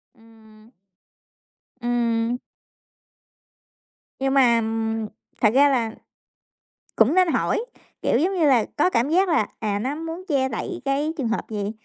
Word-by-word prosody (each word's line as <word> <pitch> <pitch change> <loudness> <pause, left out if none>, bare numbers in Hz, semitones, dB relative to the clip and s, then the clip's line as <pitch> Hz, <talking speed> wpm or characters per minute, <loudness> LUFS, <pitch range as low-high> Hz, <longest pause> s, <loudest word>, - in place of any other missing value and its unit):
Ừm. 220 0 -20 1.1
Ừm. 235 0 0 1.8
Nhưng 270 0 0
mà 240 -4 +4 0.8
thật 215 - +5
ra 285 +2 +5
là 235 -4 0 1.0
cũng 240 +10 +4
nên 370 -1 +5
hỏi, 445 +7 0 0.4
kiểu, - - +2
giống 370 +5 +1
như 330 -4 +2
là, 245 -5 +4
có 360 - +3
cảm 245 -2 +1
giác 370 +3 +3
là, 300 -10 +2
à, 205 -2 -1
nó 265 +6 -2
muốn 330 +3 -6
che 265 -4 +1
đậy 225 - -5
cái 290 +4 0
trường 255 -5 -1
hợp 230 - -3
gì. 205 -1 -3
250 Hz, 135 wpm, -23 LUFS, 225-300 Hz, 1.8 s, thật